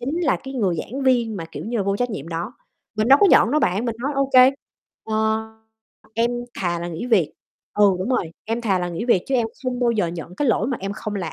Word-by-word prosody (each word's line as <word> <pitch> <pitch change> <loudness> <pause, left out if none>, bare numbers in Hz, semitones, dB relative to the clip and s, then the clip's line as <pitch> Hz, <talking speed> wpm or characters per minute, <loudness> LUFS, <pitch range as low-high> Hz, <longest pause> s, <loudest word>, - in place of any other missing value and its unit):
chính 280 +8 -2
là 300 - +2
cái 270 0 -7
người 195 -9 0
giảng 260 - -5
viên 240 -4 +2
mà, 165 - -5
kiểu - - -6
như 235 +2 -2
là, - - +1
vô 200 0 0
trách 245 +2 -1
nhiệm 165 -7 -6
đó. 170 +8 -4 0.4
Mình 215 +2 +1
đâu 275 +1 +8
có - - +8
nhận 225 - +6
đâu 305 - +3
bạn, 200 -2 +1
mình 230 -2 -2
nói: 275 +5 -2
"Ô 275 0 0
kê, 255 0 +8 0.5
ờ, 220 - -3 1.0
em 230 +1 +2 0.3
thà 175 -2 -1
là 170 +1 -4
nghỉ 170 +7 -5
việc" 210 -10 +2 0.4
ừ, 210 - +4
đúng 185 - -3
rồi, 180 -10 0
"Em 225 +2 -2
thà 200 -5 +1
là 175 0 -2
nghỉ 175 +5 -4
việc 235 -7 +3
chứ 270 - -1
em 240 -3 +2 0.2
không 250 -1 -2
bao 240 -1 +3
giờ 215 -6 +1
nhận 170 +1 -7
cái 285 - +1
lỗi 225 - +2
mà 260 - -1
em 195 +1 -3
không 210 +1 -5
làm." 175 -5 -4
225 Hz, 265 wpm, -22 LUFS, 185-255 Hz, 1.0 s, đâu